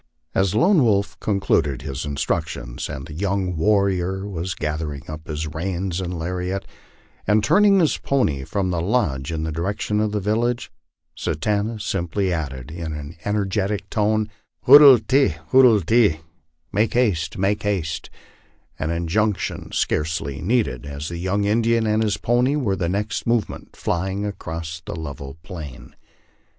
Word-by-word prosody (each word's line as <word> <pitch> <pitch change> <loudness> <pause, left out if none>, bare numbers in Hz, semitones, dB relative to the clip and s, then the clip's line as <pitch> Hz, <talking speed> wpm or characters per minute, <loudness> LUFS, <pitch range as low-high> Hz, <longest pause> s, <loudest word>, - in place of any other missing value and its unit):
As 95 0 +1
Lone 175 - +4
Wolf 100 -3 +1
concluded 90 - 0
his 65 +2 -4
instructions, 70 -4 -3
and 65 - -6
the 80 - -9
young 95 +1 -1
warrior 95 +1 +1
was 90 -1 -4
gathering 75 -3 -3
up 80 0 -8
his 75 0 -3
reins 85 +3 -3
and 90 -1 -4
lariat, 90 +3 -3 0.6
and 105 +1 +3
turning 200 - +5
his 160 -4 +2
pony 80 - 0
from 95 +5 -1
the 85 -2 -1
lodge 80 - 0
in 80 -1 -2
the 80 - -2
direction 100 +6 -1
of 105 -1 +1
the 105 - -1
village, 115 +4 -1 0.4
Satanta 105 +6 -1
simply 95 -2 -1
added, 70 -4 -4
in 80 -1 -5
an 75 +1 -7
en 105 - -1
ergetic 100 0 -1
tone, 110 0 +1 0.2
" - - -50
Hoodle 140 -1 +10
teh, 135 - +3 0.2
hoodle 125 -5 +6
teh" 105 -8 +3 0.5
(make 110 +3 +1
haste, 90 -11 +1
make 100 +2 +1
haste); 95 -7 -2 0.7
an 80 - -1
injunc 85 +5 +1
tion - - -5
scarcely 75 -3 -1
needed, 100 - 0
as 70 +1 -6
the 85 -1 -5
young 95 +3 0
Indian 115 +2 +2
and 110 0 +2
his 105 -2 +1
pony 125 +4 +2
were 120 -10 0
the 85 -2 -1
next 100 +4 -2
moment 115 -2 -1
flying 95 +3 -2
across 80 -4 -5
the 80 - -6
level 70 -3 -7
plain. 80 -9 -9
95 Hz, 155 wpm, -22 LUFS, 80-105 Hz, 0.7 s, Hoodle